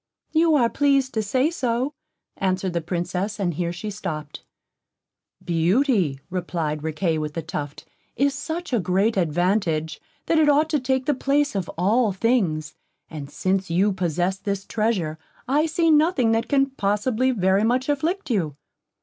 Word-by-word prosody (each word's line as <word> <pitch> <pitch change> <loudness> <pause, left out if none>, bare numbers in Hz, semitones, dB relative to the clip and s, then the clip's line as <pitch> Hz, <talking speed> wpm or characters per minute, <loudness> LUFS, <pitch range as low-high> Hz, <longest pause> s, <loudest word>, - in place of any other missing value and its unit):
"You 320 0 +4
are 245 -5 +4
pleased 275 0 +2
to 220 - 0
say 255 +9 +1
so," 255 -2 -1 0.4
answered 185 -1 -1
the 170 - -1
Princess, 180 +5 -3
and 180 -3 0
here 170 +2 -2
she 195 +5 -5
stopped. 155 -7 -6 1.0
"Beauty," 175 - +2
replied 165 -4 -2
Riquet 160 +1 -1
with 150 -1 -4
the 165 - -3
Tuft, 150 -4 -6 0.3
"is 280 +2 +2
such 320 +2 -5
a 240 - +3
great 195 +4 +1
advantage, 170 -3 0 0.2
that 325 - +2
it 305 -1 +4
ought 300 +2 +3
to 300 - +2
take 260 0 0
the 295 - +2
place 285 +2 +1
of 190 -4 -3
all 210 +5 +2
things; 185 -8 0 0.4
and 145 -3 -7
since 190 +4 -1
you 190 +5 +2
possess 180 +1 -1
this 200 0 -3
treasure, 195 -9 -1 0.3
I 295 +5 +2
see 325 +1 +2
nothing 300 -6 +3
that 225 0 +1
can 275 -1 +2
possibly 220 +3 0
very 195 -4 +2
much 250 +3 +1
afflict 315 +3 -1
you." 165 - 0
205 Hz, 160 wpm, -23 LUFS, 175-265 Hz, 1.0 s, You